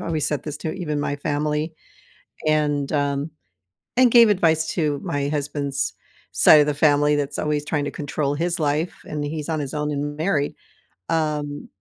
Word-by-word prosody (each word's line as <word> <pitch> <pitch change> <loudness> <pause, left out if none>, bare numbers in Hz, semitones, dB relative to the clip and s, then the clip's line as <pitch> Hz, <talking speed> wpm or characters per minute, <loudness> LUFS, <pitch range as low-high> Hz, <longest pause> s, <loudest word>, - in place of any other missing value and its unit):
always 155 -3 -1
said 150 -4 -2
this 150 -1 -5
to 155 - -3
even 150 -5 -3
my 145 0 -1
family, 150 +2 -1 0.7
and, 150 -2 +1
um, 145 +1 0 0.6
and 250 -1 +5
gave 235 -1 +8
advice 160 -6 +2
to 150 -4 0
my 145 0 -2
husband's 145 -1 -2 0.4
side 155 - +7
of 150 - +4
the 150 - +1
family 145 0 +3
that's 145 -1 -2
always 150 -1 0
trying 150 -1 -1
to - - -3
control 145 -1 -2
his 170 +3 -1
life 155 +3 0
and 150 -1 -4
he's 150 0 -4
on 160 -2 -1
his 140 -2 -5
own 150 0 -1
and 145 0 -3
married, 155 -3 0 0.6
um, 150 -3 -1
150 Hz, 175 wpm, -23 LUFS, 145-155 Hz, 0.7 s, gave